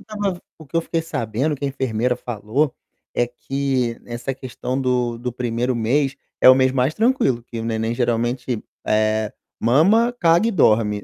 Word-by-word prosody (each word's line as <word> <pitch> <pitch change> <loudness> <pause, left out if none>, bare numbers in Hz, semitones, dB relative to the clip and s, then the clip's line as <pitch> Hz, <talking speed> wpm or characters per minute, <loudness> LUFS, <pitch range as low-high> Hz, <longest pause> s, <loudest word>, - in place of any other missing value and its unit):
estava 205 -2 0
ven 175 - -10 0.2
o 155 - -13
que 165 - -4
eu - - +4
fiquei 165 0 -2
sabendo, 140 0 -2
que 140 - -6
a - - +1
enfermeira 125 -2 -1
falou, 120 +5 -1 0.4
é 120 - +2
que 130 -1 -2
essa 120 +2 -4
questão 130 0 -4
do 125 -2 0
do 125 +1 -4
1º 120 +1 -1
mês, 135 +5 +1 0.2
é - - +8
o 130 - +10
mês 130 0 +3
mais 130 +3 +1
tranquilo, 220 - +2
que 115 -1 -7
o 115 - -5
neném 115 0 -1
geralmente, 120 0 -1 0.2
eh, 110 0 +1 0.3
mama, 195 - +4
caga 170 +5 +4
e - - +1
dorme. 105 - +2
125 Hz, 180 wpm, -21 LUFS, 115-140 Hz, 0.4 s, o